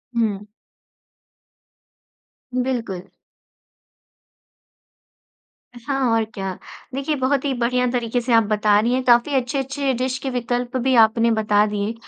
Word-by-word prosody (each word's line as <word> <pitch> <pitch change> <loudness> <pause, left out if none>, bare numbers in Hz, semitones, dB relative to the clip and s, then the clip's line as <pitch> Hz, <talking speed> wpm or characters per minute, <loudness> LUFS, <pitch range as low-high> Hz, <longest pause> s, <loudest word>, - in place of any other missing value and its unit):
हुँ। 210 -3 -1 2.1
बिल्कुल। 245 -7 -2 2.8
हाँ, 270 +1 -1
और 225 0 +2
क्या। 195 -1 -4 0.4
देखिए, 275 +3 -1
बहुत 270 +1 0
ही 275 - 0
बढ़िया 250 +1 +1
तरीके 245 -1 -1
से 240 0 -1
आप 225 0 +6
बता 210 0 +2
रही 235 +3 +1
हैं। 260 0 0
काफ़ी 240 +4 +4
अच्छे-अच्छे 270 +2 -1
डिश 255 +1 -1
के 270 - -4
विकल्प 245 0 -3
भी 260 +1 +1
आपने 230 +1 +2
बता 210 -1 +2
दिए। 205 +1 -2
245 Hz, 120 wpm, -21 LUFS, 220-260 Hz, 2.8 s, आप